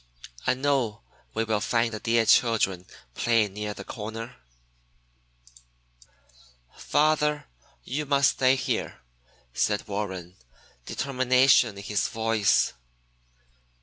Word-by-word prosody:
I 130 Hz, -, +3 dB
know 130 Hz, -, -1 dB
that -, -, -33 dB
we 115 Hz, -, +1 dB
will 110 Hz, -2 st, 0 dB
find 115 Hz, 0 st, 0 dB
the 110 Hz, -, -4 dB
dear 115 Hz, 0 st, +1 dB
children 105 Hz, -6 st, +2 dB, 0.3 s
playing 115 Hz, -, +1 dB
near 105 Hz, 0 st, -5 dB
the -, -, -8 dB
corner." 115 Hz, +1 st, -7 dB, 2.4 s
"Father, 150 Hz, -1 st, +1 dB, 0.4 s
you 145 Hz, +3 st, -4 dB
must 140 Hz, 0 st, +4 dB
stay 130 Hz, 0 st, +3 dB
here," 130 Hz, -, -3 dB, 0.5 s
said 105 Hz, +11 st, 0 dB
Warren, 95 Hz, -3 st, -5 dB, 0.5 s
determination 130 Hz, -4 st, +3 dB
in 100 Hz, -, -8 dB
his 105 Hz, -1 st, -1 dB
voice. 110 Hz, -3 st, +1 dB
115 Hz, 105 wpm, -26 LUFS, 105-130 Hz, 2.4 s, must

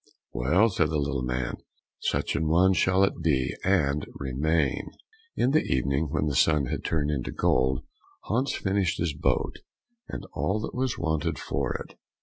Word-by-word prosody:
"Well," 85 Hz, -, +3 dB
said 80 Hz, -6 st, +1 dB
the 80 Hz, -, 0 dB
little 70 Hz, -2 st, -1 dB
man, 60 Hz, -1 st, -2 dB, 0.4 s
"such -, -, -1 dB
an 80 Hz, -, 0 dB
one 90 Hz, +4 st, +4 dB
shall 95 Hz, +1 st, +3 dB
it 100 Hz, -, 0 dB
be, 70 Hz, -6 st, +1 dB
and 75 Hz, -6 st, +2 dB
remain." 70 Hz, +2 st, 0 dB, 0.5 s
In 130 Hz, -, +2 dB
the 155 Hz, -, +4 dB
evening, 70 Hz, +4 st, 0 dB
when 75 Hz, 0 st, 0 dB
the 75 Hz, -3 st, -1 dB
sun 75 Hz, -1 st, +4 dB
had -, -, -3 dB
turned 75 Hz, -2 st, 0 dB
into 70 Hz, -4 st, -2 dB
gold, 65 Hz, 0 st, +1 dB, 0.4 s
Hans 130 Hz, +6 st, 0 dB
finished 95 Hz, -3 st, 0 dB
his 85 Hz, -3 st, -1 dB
boat, 70 Hz, -, 0 dB, 0.5 s
and -, -, -6 dB
all 105 Hz, +3 st, 0 dB
that -, -, -5 dB
was 130 Hz, -1 st, -1 dB
wanted 80 Hz, -3 st, -1 dB
for 65 Hz, -1 st, -2 dB
it. -, -, -8 dB
75 Hz, 165 wpm, -27 LUFS, 70-95 Hz, 0.5 s, one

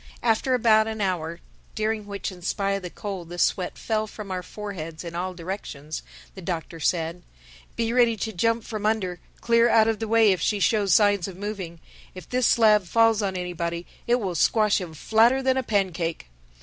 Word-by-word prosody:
After 240 Hz, +3 st, +2 dB
about 220 Hz, -2 st, +4 dB
an 220 Hz, -1 st, -4 dB
hour, 170 Hz, -4 st, -2 dB, 0.3 s
during 215 Hz, -1 st, -1 dB
which 200 Hz, 0 st, -4 dB
in 180 Hz, -1 st, -12 dB
spite 195 Hz, +3 st, -1 dB
of 195 Hz, 0 st, -1 dB
the 180 Hz, -, -6 dB
cold 190 Hz, -3 st, -6 dB
the 175 Hz, -, -7 dB
sweat 180 Hz, +1 st, 0 dB
fell 215 Hz, -1 st, -1 dB
from 210 Hz, -2 st, -8 dB
our 185 Hz, -1 st, -2 dB
foreheads 180 Hz, -5 st, -7 dB
in 170 Hz, -1 st, -7 dB
all 180 Hz, +2 st, -3 dB
directions, 165 Hz, -4 st, -6 dB, 0.3 s
the 190 Hz, -, -10 dB
Doctor 170 Hz, -1 st, -4 dB
said, 170 Hz, +1 st, -1 dB, 0.5 s
"Be 230 Hz, 0 st, -1 dB
ready 240 Hz, -2 st, +4 dB
to 220 Hz, +2 st, -3 dB
jump 230 Hz, +5 st, +1 dB
from 215 Hz, -2 st, -3 dB
under, 190 Hz, -5 st, -1 dB, 0.2 s
clear 235 Hz, 0 st, +4 dB
out 220 Hz, -1 st, +5 dB
of 225 Hz, -1 st, 0 dB
the 225 Hz, -, -3 dB
way, 225 Hz, -1 st, +5 dB
if 185 Hz, -4 st, 0 dB
she 210 Hz, +3 st, +1 dB
shows 200 Hz, +1 st, +2 dB
signs 205 Hz, 0 st, +4 dB
of 185 Hz, -2 st, -9 dB
moving. 190 Hz, -5 st, -5 dB, 0.4 s
If 185 Hz, -3 st, -10 dB
this 250 Hz, -1 st, +1 dB
slab 215 Hz, -4 st, +5 dB
falls 225 Hz, +3 st, +3 dB
on 190 Hz, -2 st, -2 dB
anybody, 170 Hz, -1 st, -3 dB, 0.2 s
it 240 Hz, -, +4 dB
will 200 Hz, -7 st, -2 dB
squash 210 Hz, +5 st, +3 dB
him 165 Hz, -3 st, -7 dB
flatter 230 Hz, -, +3 dB
than 260 Hz, 0 st, +2 dB
a 265 Hz, -, +1 dB
pancake." 180 Hz, -, -1 dB
200 Hz, 195 wpm, -25 LUFS, 175-220 Hz, 0.5 s, out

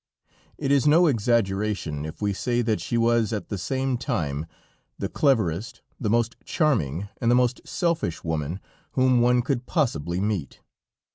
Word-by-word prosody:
It 140 Hz, -2 st, -1 dB
is 140 Hz, 0 st, +4 dB
no 165 Hz, +4 st, +6 dB
exaggeration, 105 Hz, -, 0 dB
if 80 Hz, +6 st, -7 dB
we 100 Hz, -1 st, +1 dB
say 120 Hz, +4 st, 0 dB
that 110 Hz, -2 st, 0 dB
she 120 Hz, -, -1 dB
was 115 Hz, -2 st, +2 dB
at 105 Hz, -2 st, -4 dB
the 100 Hz, -, -3 dB
same 130 Hz, +5 st, -1 dB
time 80 Hz, -, -2 dB, 0.5 s
the -, -, -2 dB
cleverest, 115 Hz, -, 0 dB, 0.2 s
the 110 Hz, -, -1 dB
most 115 Hz, +1 st, +1 dB
charming 100 Hz, -, 0 dB
and 115 Hz, -, 0 dB
the 120 Hz, -, +5 dB
most 125 Hz, 0 st, +2 dB
selfish 170 Hz, -, -1 dB
woman 80 Hz, +2 st, -2 dB, 0.3 s
whom 130 Hz, -2 st, +3 dB
one 125 Hz, 0 st, +3 dB
could 125 Hz, -2 st, -2 dB
possibly 90 Hz, -, 0 dB
meet. 100 Hz, -7 st, -2 dB
115 Hz, 155 wpm, -25 LUFS, 95-130 Hz, 0.5 s, no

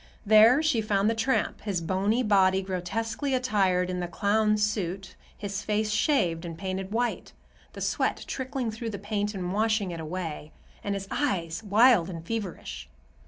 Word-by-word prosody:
There 220 Hz, +7 st, +6 dB
she 275 Hz, -8 st, +2 dB
found 210 Hz, 0 st, +1 dB
the -, -, +1 dB
tramp, 225 Hz, +4 st, 0 dB
his 200 Hz, -4 st, -2 dB
bony 195 Hz, +8 st, 0 dB
body 190 Hz, -3 st, +3 dB
grotesquely 225 Hz, -, -2 dB
attired 195 Hz, -8 st, +1 dB
in 180 Hz, 0 st, -3 dB
the 175 Hz, -, -2 dB
clown's 210 Hz, +3 st, +1 dB
suit, 195 Hz, -2 st, -2 dB, 0.2 s
his 200 Hz, 0 st, -4 dB
face 215 Hz, 0 st, -1 dB
shaved 185 Hz, -, +1 dB
and 165 Hz, -2 st, -6 dB
painted 190 Hz, +1 st, -4 dB
white,—the 240 Hz, +2 st, -5 dB
sweat -, -, 0 dB
trickling 260 Hz, -3 st, -3 dB
through 225 Hz, +1 st, -5 dB
the 205 Hz, -, -5 dB
paint 205 Hz, +1 st, -2 dB
and 180 Hz, -1 st, -3 dB
washing 215 Hz, -2 st, +1 dB
it 170 Hz, -, -6 dB
away,—and 165 Hz, +3 st, -6 dB
his 195 Hz, 0 st, -5 dB
eyes 175 Hz, -, -1 dB
wild 215 Hz, -3 st, +4 dB
and 165 Hz, -2 st, -7 dB
feverish. 170 Hz, -, -5 dB
205 Hz, 155 wpm, -27 LUFS, 185-225 Hz, 0.2 s, There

